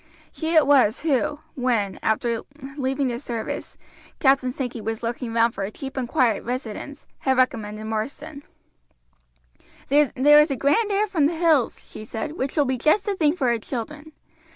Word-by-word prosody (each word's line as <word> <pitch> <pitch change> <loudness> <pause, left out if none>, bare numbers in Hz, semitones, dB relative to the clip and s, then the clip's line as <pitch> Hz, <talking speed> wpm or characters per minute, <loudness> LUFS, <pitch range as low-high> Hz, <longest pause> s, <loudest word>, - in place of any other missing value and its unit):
She 325 +1 -2
it 315 - +6
was 260 -5 +4
who, 290 -1 0
when, 235 -7 -1
after 230 +1 0 0.3
leaving 270 -1 -1
the 240 -1 -3
service, 235 -4 -5 0.4
Captain 270 -2 +3
Sankey 250 -3 -5
was 225 +2 -4
looking 235 +1 -3
round 230 0 +2
for 195 - -4
a 195 - -3
cheap 270 +5 -8
and 260 -3 -2
quiet 235 -6 +2
residence, 250 +3 -6
had 265 -1 +1
recommended 215 -4 0
Marsden. 280 +7 -5 1.5
"There 290 0 +4 0.3
is 300 +1 +4
a 275 - -1
grand 410 - +2
air 405 +2 +2
from 330 -8 +2
the 335 - -3
hills," 320 -7 +2
she - - -10
said, 225 +6 -5
"which 275 -4 -4
will 295 - +4
be 260 -1 -1
just 310 - +3
the 410 -2 -1
thing 310 -3 +2
for 255 -8 +1
the 230 - -2
children. 295 +7 -6
260 Hz, 175 wpm, -23 LUFS, 230-295 Hz, 1.5 s, it